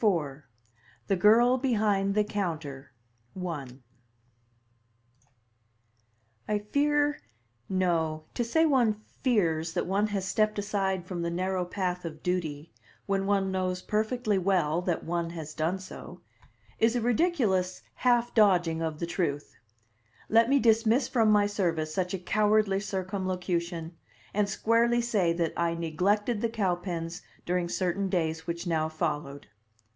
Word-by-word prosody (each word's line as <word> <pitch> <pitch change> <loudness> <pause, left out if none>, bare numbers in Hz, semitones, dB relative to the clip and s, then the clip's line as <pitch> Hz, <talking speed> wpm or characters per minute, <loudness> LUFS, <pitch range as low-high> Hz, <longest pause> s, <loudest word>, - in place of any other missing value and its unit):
IV: 155 -9 +1 0.6
THE 195 - +1
GIRL 235 +7 +5
BEHIND 205 -6 +1
THE 210 - +4
COUNTER 165 -10 -4 0.5
I 165 -7 -4 2.8
I 210 - +1
fear 290 +7 +1 0.5
no; 165 -4 0
to 240 - -1
say 320 +8 +2
one 240 -8 +2 0.2
"fears" 165 - +1
that 175 - -1
one 200 +3 +1
has 195 -2 -3
stepped 215 +1 +1
aside 195 -3 -1
from 180 -2 -4
the 170 - -1
narrow 185 +1 -1
path 180 -1 -3
of 155 -2 -7
duty, 165 -4 -2 0.3
when 195 0 0
one 195 -1 +1
knows 185 -1 -2
perfectly 215 -1 0
well 175 -4 +1
that 180 -2 -2
one 170 0 -2
has 160 -2 -7
done 165 +5 -1
so, 190 - -10 0.6
is 225 +1 +3
a 245 - +1
ridiculous 225 - +1
half 240 -1 +2
dodging 175 -7 +3
of 160 -2 -2
the 170 - -3
truth; 165 -4 -3 0.7
let 230 +2 +5
me 280 - +5
dismiss 230 +1 +3
from 225 -3 +2
my 210 -1 +5
service 165 -6 -1
such 185 +1 -1
a 180 -1 -9
cowardly 210 -2 +2
circumlocution, 180 -4 -3 0.4
and 205 0 +1
squarely 230 +3 +2
say 215 -8 +1
that 170 -1 -1
I 170 0 0
neglected 200 +7 0
the 230 - +1
Cowpens 175 -4 -2 0.2
during 175 -1 0
certain 190 +2 -1
days 160 -3 -1
which 170 +1 -3
now 160 -2 0
followed. 150 -3 -3
190 Hz, 135 wpm, -28 LUFS, 170-215 Hz, 2.8 s, GIRL